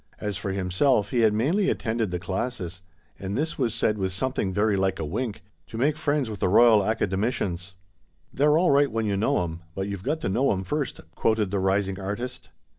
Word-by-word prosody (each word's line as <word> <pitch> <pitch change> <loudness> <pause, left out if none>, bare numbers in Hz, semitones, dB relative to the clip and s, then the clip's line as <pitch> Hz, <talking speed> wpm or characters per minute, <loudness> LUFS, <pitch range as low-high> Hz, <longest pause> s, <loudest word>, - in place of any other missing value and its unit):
As 105 -1 -3
for 95 0 -3
himself, 100 +5 +1
he 125 - +1
had 110 -2 +5
mainly 160 - +1
attended 110 -2 -1
the 90 - -2
classes 95 0 -4 0.4
(and 100 +1 -3
this 160 +1 -2
was 120 -4 0
said 105 -1 +1
with 95 -1 -1
something 100 0 -1
very 105 +2 +2
like 95 0 0
a 80 - -3
wink) 105 +6 -4 0.2
to 110 - -8
make 145 +5 +2
friends 145 -3 0
with 105 -3 -6
the - - +1
Koyal 110 +2 +6
Academicians. 95 -3 -1 0.6
"They're 150 +3 +4
all 175 -2 +3
right 140 -1 +4
when 110 0 -1
you 100 -2 0
know 95 -3 +1
'em, 85 0 -6
but 95 0 -2
you've 100 -2 -5
got 150 +10 -1
to - - -2
know 125 +8 +2
'em 95 -1 -3
first," 145 +6 -3
quoted 110 -3 +1
the 100 - 0
rising 95 0 0
artist. 120 +7 -5
105 Hz, 205 wpm, -25 LUFS, 95-125 Hz, 0.6 s, Koyal